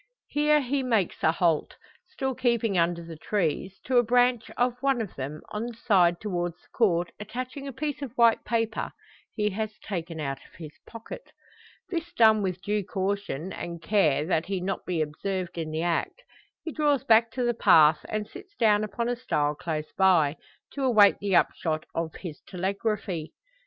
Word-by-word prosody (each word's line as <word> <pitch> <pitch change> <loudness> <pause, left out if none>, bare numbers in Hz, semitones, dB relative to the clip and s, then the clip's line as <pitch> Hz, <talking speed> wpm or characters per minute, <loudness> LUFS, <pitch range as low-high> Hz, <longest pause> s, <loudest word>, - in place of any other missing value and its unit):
Here 300 0 +3
he 275 +1 -1
makes 225 -8 0
a 160 - +4
halt, 165 -2 +1 0.3
still 270 -8 -3
keeping 235 -4 +1
under 170 0 +1
the 165 -1 -8
trees; 190 +1 -2
to 255 -1 +1
a - - +4
branch 245 0 +2
of 245 0 0
one 275 -2 +2
of 220 -5 -4
them, 140 +3 -6
on 215 +3 -3
the 240 - -7
side 180 -7 +3
towards 175 -5 -2
the - - -29
Court 175 -7 +2
attaching 255 +6 -6
a - - -4
piece 290 +2 -4
of 275 -5 -5
white 235 -1 +5
paper, 225 -1 -1 0.4
he 210 -1 0
has 215 +2 -4
taken 170 -5 -5
out 135 -2 -3
of - - -20
his 160 -3 -9 0.2
pocket. 230 - -10 0.6
This 340 -1 -3
done 220 -6 +5
with 185 -1 -3
due 210 0 0
caution, 190 -3 -3
and 170 -1 -6
care 160 -6 +2
that 165 -1 0
he 195 - -2
be 180 - -5
not 195 0 -2
observed 175 +3 -2
in 165 -2 -3
the 160 +1 -2
act, 175 - -1 0.4
he 325 - -4
draws 290 -4 +1
back 230 0 +5
to 255 - -1
the 240 0 +2
path, 160 -9 +5
and 215 -1 -2
sits 390 - -13
down 215 - +3
upon 215 +3 -2
a 245 - 0
stile 150 -12 0
close 155 0 -4
by 175 -6 +4 0.4
to 280 - -4
await 215 -6 +5
the 200 -2 0
upshot 155 -2 +1
of 165 -1 -3
his 165 -5 -8
telegraphy. 190 -2 -3
205 Hz, 185 wpm, -27 LUFS, 170-240 Hz, 0.6 s, white